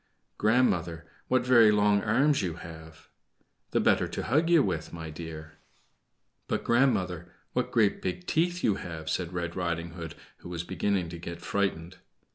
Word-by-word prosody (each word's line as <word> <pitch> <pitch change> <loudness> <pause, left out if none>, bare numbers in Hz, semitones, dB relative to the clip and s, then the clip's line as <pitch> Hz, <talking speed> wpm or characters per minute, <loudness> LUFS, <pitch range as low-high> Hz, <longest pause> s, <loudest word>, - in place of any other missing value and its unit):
"Grandmother, 90 -8 +2 0.2
what 130 -1 +2
very 120 -4 +7
long 105 -1 +3
arms 135 +8 +3
you 90 -4 -2
have!" 80 -1 -11 0.6
"The - - +1
better - - +3
to - - -4
hug 155 +7 +2
you 170 -4 +6
with, 80 -1 -2
my 80 -2 -7
dear." 80 0 -9 0.9
"But, - - -1
grandmother, 95 -9 +1 0.2
what 125 0 0
great 110 -4 +2
big 90 -1 -3
teeth 175 +2 0
you 105 -3 +2
have," 80 -4 -6
said 85 +1 -2
Red 85 -1 -3
Riding 85 -2 -2
Hood, 80 -2 -7 0.2
who - - -11
was 85 -1 -4
beginning 95 -1 -1
to 85 0 -7
get 85 0 -7
frightened. 95 -2 -2
90 Hz, 160 wpm, -28 LUFS, 85-110 Hz, 0.9 s, very